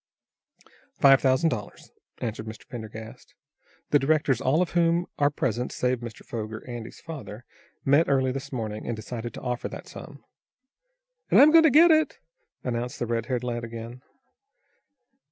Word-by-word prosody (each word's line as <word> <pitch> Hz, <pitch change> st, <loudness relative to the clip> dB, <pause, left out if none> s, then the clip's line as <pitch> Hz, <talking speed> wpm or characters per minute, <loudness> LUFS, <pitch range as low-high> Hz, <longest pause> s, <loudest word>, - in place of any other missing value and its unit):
"Five 135 Hz, -1 st, +7 dB
thousand 130 Hz, +4 st, +3 dB
dollars," 105 Hz, -8 st, -6 dB, 0.3 s
answered 110 Hz, -1 st, -4 dB
Mr. 110 Hz, 0 st, -9 dB
Pendergast. 110 Hz, -1 st, -9 dB, 0.6 s
"The 145 Hz, -, +5 dB
directors, 140 Hz, -3 st, +1 dB
all 145 Hz, +7 st, +3 dB
of 180 Hz, -, -6 dB
whom 170 Hz, 0 st, +2 dB
are 145 Hz, 0 st, +4 dB
present 125 Hz, -4 st, -2 dB
save 125 Hz, -1 st, 0 dB
Mr. 120 Hz, -2 st, -9 dB
Foger, 110 Hz, 0 st, -6 dB
Andy's 120 Hz, -2 st, -7 dB
father, 135 Hz, -8 st, -9 dB, 0.4 s
met 140 Hz, +4 st, +4 dB
early 130 Hz, -2 st, +2 dB
this 135 Hz, +1 st, -6 dB
morning, 110 Hz, -4 st, -4 dB
and 120 Hz, -, -2 dB
decided 115 Hz, +1 st, -6 dB
to -, -, -8 dB
offer 125 Hz, -1 st, -3 dB
that -, -, -9 dB
sum." -, -, -11 dB, 1.1 s
"And -, -, +6 dB
I'm 295 Hz, +2 st, +8 dB
going 325 Hz, 0 st, +7 dB
to -, -, +7 dB
get 325 Hz, +5 st, +7 dB
it," 315 Hz, 0 st, +2 dB, 0.5 s
announced 125 Hz, +1 st, -3 dB
the -, -, -2 dB
red 115 Hz, -1 st, -2 dB
haired 125 Hz, -2 st, -1 dB
lad 120 Hz, -1 st, -3 dB
again. 115 Hz, +2 st, -8 dB
125 Hz, 155 wpm, -26 LUFS, 115-145 Hz, 1.1 s, I'm